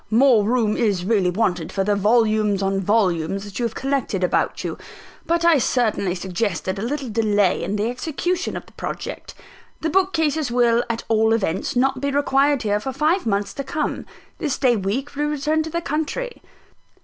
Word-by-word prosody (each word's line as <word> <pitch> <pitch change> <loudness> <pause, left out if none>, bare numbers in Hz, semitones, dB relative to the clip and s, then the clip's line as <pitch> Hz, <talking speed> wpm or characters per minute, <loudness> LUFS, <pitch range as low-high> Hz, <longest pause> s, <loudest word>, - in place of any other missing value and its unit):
"More 235 -1 +5
room 220 -1 +1
is 200 -6 0
really 200 -4 +2
wanted 180 -4 -1
for 195 - 0
the 205 +1 +1
volumes 215 -1 +2
on 195 0 0
volumes 195 -2 +1
that 205 +1 -7
you 240 - 0
have 225 - -3
collected 265 -8 -1
about 180 - 0
you; - - -4 0.5
but 335 0 +1
I 335 -4 +6
certainly 220 -7 0
suggested 190 0 -2
a - - -4
little 270 +4 -3
delay 210 -4 +1
in 200 - -2
the 210 +2 0
execution 330 +8 -2
of - - -8
the - - -19
project. - - -6 0.5
The 320 - -1
bookcases 320 -6 +1
will, 240 -1 +3
at 230 0 -2
all 220 0 +3
events, 195 -3 -1
not 260 +1 +1
be 280 - 0
required 280 -1 +2
here 205 -1 +1
for 265 +5 -4
five 315 +3 +1
months 200 -1 0
to 275 - -4
come. 295 +3 -3 0.3
This 300 -5 -1
day 250 -3 +3
week 230 +9 -3
we 290 - -2
return 300 +1 0
to 320 - -4
the 340 +1 -2
country." 320 - -3
230 Hz, 185 wpm, -22 LUFS, 205-285 Hz, 0.5 s, I